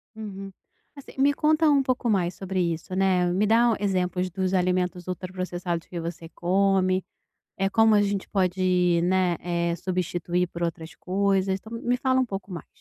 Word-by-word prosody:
Uhum. 195 -3 -7 0.4
Assim, 280 - -12
me 285 +1 +4
conta 310 +1 +3
um 280 -2 +4
pouco 255 -2 -1
mais 180 -4 +1
sobre 190 -1 -2
isso, 170 +3 -7
né, 185 -2 +2
me 205 +3 +2
dá 230 +1 +4
exemplos 185 -2 0
dos 185 +1 -2
alimentos 180 -1 0
ultra 185 0 -5
processados 175 -2 -3
que 175 - -6
você 165 0 -6
come, 185 +1 +1 0.5
eh, 195 0 +1
como 225 0 +4
a 205 - +5
gente 200 -1 -1
pode, 180 -2 +1
né, 180 -2 +2
eh, 170 -1 -1
substituir 180 0 -1
por 170 0 -6
outras 165 -1 -4
coisas, 195 0 0
então 220 +3 -14
me 245 +1 +1
fala 260 0 +1
um 255 - +2
pouco 195 -3 -6
mais. 170 -4 -7
185 Hz, 175 wpm, -25 LUFS, 180-200 Hz, 0.5 s, a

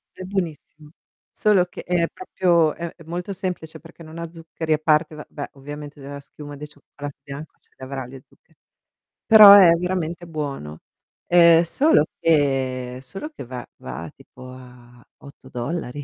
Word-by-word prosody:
È 185 - -8
buonissimo. 160 -5 -5 0.4
Solo 205 -4 +3
che 180 - -10
è 175 -1 +1
proprio 175 - +1
è 170 -1 -6
è 165 - -15
molto 175 +4 -5
semplice 180 -4 -5
perché 170 0 -15
non 160 +1 -11
ha 170 -1 -6
zuccheri, 165 -1 -3
a - - 0
parte, 155 0 +2
va 150 - -9
beh, 145 - -7
ovviamente 145 +1 -9
d - - -12
la 140 +1 -8
schiuma 145 +1 -11
di 150 +1 -8
cioccolato 145 -1 -10
bianco 140 +3 -9
ce - - -24
li - - -18
avrà 130 -1 -5
gli 130 +1 -11
zuccheri, - - -30 0.7
però 210 -2 +10
è 190 -4 +9
veramente 175 -1 -3
buono. 140 - -6 0.5
Ehm, 170 -1 +6
solo 175 - +3 0.2
che 130 -5 +1
solo 195 - -7
che 300 - -10
va 125 0 -7
va 75 +6 -8
tipo 130 0 -14
a 125 -1 -15
$8, 140 +1 -6
155 Hz, 165 wpm, -22 LUFS, 135-170 Hz, 0.7 s, però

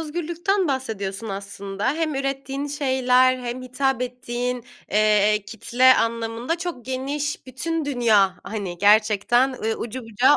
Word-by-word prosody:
özgürlükten 345 +4 -1
bahsediyorsun 225 -6 -3
aslında. 200 +1 -4
Hem 315 -2 -1
ürettiğin 275 +1 -3
şeyler 255 -3 +3
hem 245 0 -5
hitap 255 0 -1
ettiğin, 250 -1 -3 0.3
eee, 210 0 +3
kitle 250 +4 +4
anlamında 230 +6 -1
çok 340 -8 -5
geniş 275 +2 -3
bütün 320 +5 -3
dünya, 220 -9 +3
hani, 195 -5 -5
gerçekten, 215 +5 +4
ııı, 225 -3 -2
ucu 240 +3 -5
bucağı 235 +6 +4
250 Hz, 120 wpm, -23 LUFS, 215-275 Hz, 0.3 s, kitle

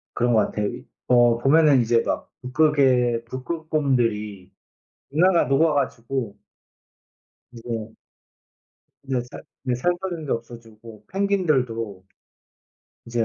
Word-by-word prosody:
그런 120 0 +1
것 110 - +5
같아요. 105 - -3
이 - - -8 0.2
어 120 -1 +5
보면은 140 +1 +4
이제 115 0 +2
막 - - -3
북극의 125 -4 +2
북극곰들이 125 - -2 0.6
빙하가 175 +4 +3
녹아 150 +5 +3
가지고 125 -4 -2 1.2
이제 115 -2 -6 1.1
네. 135 -2 -1
살 - - -9 0.2
네. 125 -2 0
살 125 +9 +1
환경도 170 -6 -3
없어지고 115 -2 -10
펭귄들도 130 - -1 1.0
이제 115 -1 0
125 Hz, 220 characters per minute, -23 LUFS, 115-150 Hz, 1.2 s, 것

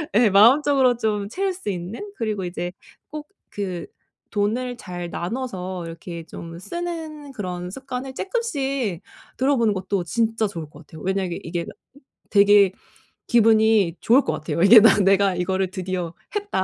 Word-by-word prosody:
예 225 0 +5
마음적으로 255 +5 +5
좀 210 -3 -1
채울 380 - -1
수 360 - -6
있는. 195 - -5
그리고 215 -4 -2
이제 175 0 -4 0.4
꼭 300 0 -7 0.2
그 185 -4 -5 0.4
돈을 230 +4 -1
잘 175 -4 -6
나눠서 185 -4 -4
이렇게 165 0 -8
좀 165 +1 -9
쓰는 320 - -6
그런 180 -5 -5
습관을 265 +1 -6
쬐끔씩 275 - -2 0.4
들어보는 245 -5 +2
것도 190 -1 -2
진짜 225 +5 0
좋을 165 -6 -7
것 150 +1 -15
같아요. 160 - -12
왜냐하면 190 -2 -2
이게 170 +1 -3
다 - - -8 0.6
되게 200 -1 +5 0.6
기분이 220 -5 +4
좋을 250 +5 +5
것 - - -1
같아요. 155 - -4
왜냐하면 210 +1 +7
'내가 195 -1 +4
이거를 190 +1 -1
드디어 185 -3 -4 0.2
했다.' 405 - -1
205 Hz, 305 characters per minute, -23 LUFS, 180-255 Hz, 0.6 s, 왜냐하면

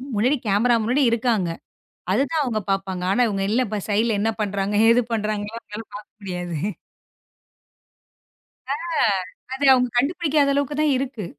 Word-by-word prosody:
முன்னாடி 250 +8 +3
கேமரா 220 +5 +3
முன்னாடி 250 +6 +1
இருக்காங்க. 225 -6 +1 0.6
அது 235 - +3
தான் 320 - +1
அவுங்க 230 -5 -1
பாப்பாங்க. 195 -2 -2
ஆனா 245 +5 +3
அவுங்க 210 +1 0
சைடுல 215 +1 +1
என்ன 225 +2 +1
பண்றாங்க, 200 0 -1
ஏது 230 +2 +6
பண்றாங்கன்லாம் 215 +1 -2
அவுங்களால 210 +2 -8
பாக்க 210 - -11
முடியாது. 180 -4 -5 2.2
ஆ - - 0 0.8
அத 265 - -6
அவுங்க 250 -1 +2
கண்டுபிடிக்காத 295 0 +2
அளவுக்கு 285 +1 -1
தான் 300 -3 +3
இருக்கு. 255 -6 -4
220 Hz, 130 wpm, -23 LUFS, 205-255 Hz, 2.2 s, ஏது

